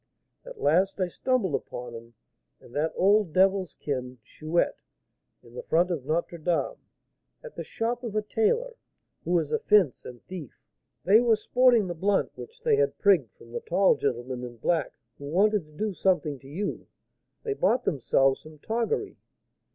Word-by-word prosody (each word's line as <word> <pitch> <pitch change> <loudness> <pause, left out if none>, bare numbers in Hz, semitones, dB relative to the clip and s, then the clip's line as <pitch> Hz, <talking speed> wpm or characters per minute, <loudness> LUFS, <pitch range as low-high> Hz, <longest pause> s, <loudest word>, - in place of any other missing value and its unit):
At - - -11
last 190 +6 +2
I 185 -1 0
stumbled 230 - 0
upon 120 -2 -5
him 115 0 -11 0.4
and 120 - -17
that 155 +2 0
old 200 -3 +3
devil's 190 -2 +2
kin, 130 -3 -4
Chouette, 155 +9 -1 0.6
in 120 - -17
the 125 - -6
front 175 +3 +1
of 150 -7 -3
Notre 170 +2 -1
Dame, 175 - -1 0.6
at - - -10
the - - -5
shop 235 +1 -3
of 225 -3 -5
a 215 - +1
tailor, 460 - 0 0.5
who 175 0 +2
is 155 -3 -1
a - - +1
'fence' 200 -10 +3
and 120 -1 -11
thief; 175 -9 -9 0.4
they 200 +8 +6
were 235 -2 +4
'sporting 240 0 +3
the 175 - -3
blunt' 195 +4 0
which 460 +2 -11
they 455 -3 +3
had 455 0 +1
prigged 175 - +3
from 115 - -16
the 120 - -4
tall 190 +3 +3
gentleman 125 -1 -3
in 120 -1 -8
black, 160 +5 0 0.3
who 140 - -8
wanted 195 +4 +2
to 155 - -21
do 210 +7 -3
something 175 -7 0
to 135 - -15
you; 185 +9 -4 0.6
they 440 -3 -1
bought 255 - +1
themselves 135 -1 +2
some 155 0 -14
toggery. 230 - -2
180 Hz, 175 wpm, -27 LUFS, 145-215 Hz, 0.6 s, they